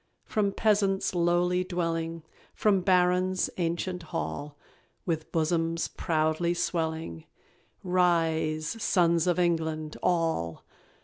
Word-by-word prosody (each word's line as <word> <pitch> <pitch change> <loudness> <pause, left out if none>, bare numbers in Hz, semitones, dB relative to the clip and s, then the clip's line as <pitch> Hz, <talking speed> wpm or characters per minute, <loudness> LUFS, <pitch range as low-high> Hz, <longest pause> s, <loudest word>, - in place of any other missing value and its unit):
From 205 -2 0
peasant's 200 -3 +1
lowly 175 +1 +2
dwelling; 165 -2 -2 0.3
From 200 -3 +3
baron's 180 0 +2
ancient 175 +1 -2
hall, 145 - -5 0.5
With 160 -3 -2
bosoms 165 +1 0
proudly 160 +1 0
swelling, 160 - -2 0.6
Rise! 165 0 +1
sons 170 -3 +2
of 175 - +2
England, 160 -3 -1
ALL! 165 - 0
170 Hz, 90 wpm, -28 LUFS, 160-180 Hz, 0.6 s, From